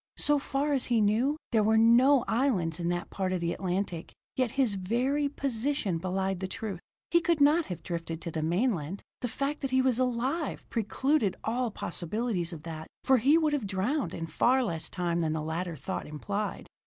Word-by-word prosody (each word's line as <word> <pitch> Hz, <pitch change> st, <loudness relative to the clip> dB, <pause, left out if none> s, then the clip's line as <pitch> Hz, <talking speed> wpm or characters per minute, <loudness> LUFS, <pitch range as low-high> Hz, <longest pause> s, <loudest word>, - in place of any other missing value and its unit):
So 295 Hz, 0 st, +3 dB
far 280 Hz, +1 st, -1 dB
as 270 Hz, -, +2 dB
he 235 Hz, -2 st, +3 dB
knew, 225 Hz, +8 st, +2 dB
there 225 Hz, -3 st, +4 dB
were 220 Hz, +1 st, +3 dB
no 240 Hz, +4 st, +6 dB
islands 215 Hz, -, +1 dB
in 170 Hz, 0 st, -1 dB
that 175 Hz, 0 st, -2 dB
part 190 Hz, -1 st, -1 dB
of 185 Hz, -, 0 dB
the 170 Hz, 0 st, -1 dB
Atlantic; 180 Hz, -2 st, -3 dB, 0.2 s
yet 255 Hz, -2 st, +1 dB
his 255 Hz, -6 st, +3 dB
very 250 Hz, +10 st, 0 dB
position 265 Hz, -, -1 dB
belied 190 Hz, +1 st, -1 dB
the 190 Hz, -, -3 dB
truth. 195 Hz, -1 st, -5 dB, 0.3 s
He 340 Hz, -, +5 dB
could 335 Hz, -1 st, +1 dB
not 300 Hz, +3 st, +4 dB
have 180 Hz, -4 st, -6 dB
drifted 165 Hz, -2 st, -4 dB
to 170 Hz, -, -4 dB
the 160 Hz, -, -2 dB
mainland; 175 Hz, -, 0 dB, 0.2 s
the 245 Hz, -, -2 dB
fact 280 Hz, +5 st, -2 dB
that 270 Hz, -, -2 dB
he 260 Hz, 0 st, +2 dB
was 260 Hz, -2 st, +2 dB
alive 255 Hz, +5 st, -1 dB
precluded 230 Hz, 0 st, +1 dB
all 240 Hz, +2 st, 0 dB
possibilities 185 Hz, 0 st, -2 dB
of 160 Hz, -3 st, -8 dB
that, 160 Hz, -1 st, -7 dB, 0.2 s
for 265 Hz, -1 st, +5 dB
he 275 Hz, +7 st, +5 dB
would 310 Hz, -2 st, +2 dB
have 265 Hz, -8 st, -1 dB
drowned 210 Hz, +10 st, -1 dB
in 165 Hz, -, -4 dB
far 250 Hz, +11 st, +2 dB
less 165 Hz, -8 st, -3 dB
time 175 Hz, -2 st, -1 dB
than 160 Hz, -1 st, 0 dB
the 155 Hz, -1 st, -2 dB
latter 165 Hz, +2 st, -3 dB
thought 140 Hz, -, -5 dB
implied. 200 Hz, +8 st, -4 dB
220 Hz, 195 wpm, -29 LUFS, 175-265 Hz, 0.3 s, no